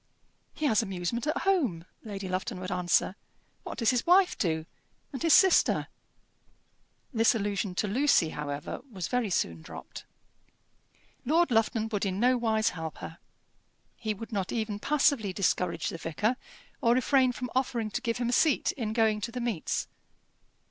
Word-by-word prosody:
"He 310 - -2
has 220 -7 +3
amusement 195 - -3
at 305 - 0
home," 265 - +1 0.2
Lady 200 -3 -6
Lufton 185 0 -3
would 185 -1 -5
answer. 180 +1 +1 0.5
"What - - -7
does 230 -3 +3
his 250 -2 0
wife 360 +1 +4
do 160 -3 -1 0.5
and 265 - -5
his 330 -2 +6
sister?" 380 -2 +4 1.2
This 225 0 +4
allusion 200 -2 -2
to 210 - 0
Lucy, 230 - +3
however, 145 -1 -5
was 185 -6 -4
very 245 -4 0
soon 85 - -1
dropped. - - -10 1.2
Lord 325 +3 +2
Lufton 225 0 +2
would 205 -3 -2
in 190 -1 -1
no 250 +3 +4
wise 220 -3 +1
help 160 -2 -6
her. 165 - -9 0.8
He 215 -2 -3
would 225 +4 -9
not 195 -4 -2
even 215 -3 -2
passively 275 -7 +2
discourage 180 -2 0
the 165 - -6
vicar, 210 +10 -1 0.5
or 235 0 +4
refrain 255 0 +3
from 250 0 -6
offering 240 -4 -1
to 245 - -2
give 230 -2 -1
him 240 -1 -1
a - - 0
seat 305 +2 +3
in 220 -5 -4
going 220 -2 +2
to 235 - -3
the 250 - -5
meets. 235 -9 -2
220 Hz, 160 wpm, -29 LUFS, 185-250 Hz, 1.2 s, his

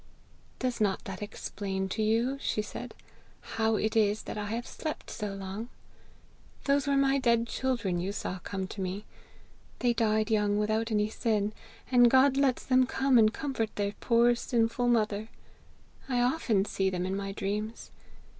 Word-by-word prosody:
'Does 250 -3 -2
not 200 -3 +1
that 195 -1 -6
explain 195 -2 -4
to 210 +3 -3
you,' 230 +5 +1
she - - -1
said, 210 - -8 0.4
'how 225 0 0
it 215 +1 -1
is 210 -1 +2
that - - -6
I 210 -1 -3
have 230 +3 -3
slept 310 -1 -6
so 210 -3 -4
long? 195 +4 -6 0.9
Those 280 0 +2
were 280 -1 +3
my 275 0 +3
dead 235 -2 +3
children 235 -8 -1
you 185 +3 -2
saw 190 -2 -4
come 190 +1 -4
to 200 - -6
me. 190 +3 -4 0.7
They 245 -1 +2
died 220 -1 +1
young, 210 -1 +2
without 215 +2 0
any 210 0 +2
sin, 215 -3 0 0.4
and 245 -1 +7
God 265 +2 +5
lets 270 -2 +1
them 255 -1 +4
come 265 -2 +3
and 215 -1 +5
comfort 230 -4 -3
their 205 0 -1
poor 235 0 +4
sinful 235 0 0
mother. 220 -2 +1 0.8
I 250 -2 +1
often 245 -6 +2
see 195 -2 0
them 180 -1 -2
in 190 +1 -2
my 195 0 -3
dreams. 210 +3 -4
220 Hz, 165 wpm, -29 LUFS, 205-245 Hz, 0.9 s, and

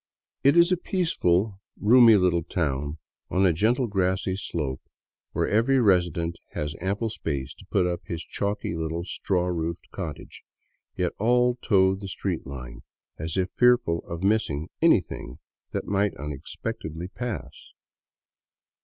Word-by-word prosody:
It 140 +4 +5
is 170 +1 +6
a 180 - +3
peaceful, 110 - 0 0.2
roomy 115 +1 +7
little 90 -3 +3
town 75 -3 -2 0.3
on 95 +1 +2
a 90 - +4
gentle, 115 +9 +2
grassy 95 -2 0
slope 75 -9 -3 0.5
where - - 0
every 120 +6 +3
resident 85 -6 +2 0.2
has 75 0 -3
ample 100 +4 -1
space 70 -9 -4
to - - -17
put 95 -3 +2
up 90 -1 -2
his 85 -1 -4
chalky 100 -4 -2
little 80 +1 -3
straw 90 -2 -1
roofed 85 -1 -3
cottage, - - -7 0.5
yet 90 -1 -1
all 125 +3 +3
toe 95 -2 +4
the 100 +1 -6
street 90 -5 -3
line, 65 -2 -8 0.4
as 80 +3 -3
if 95 0 0
fearful 125 -9 +3
of 85 +1 -5
missing 95 -6 +1
anything 90 - +2 0.3
that - - -3
might 100 -2 0
unexpectedly 75 +3 -5
pass. 95 - -5
90 Hz, 135 wpm, -26 LUFS, 80-105 Hz, 0.5 s, roomy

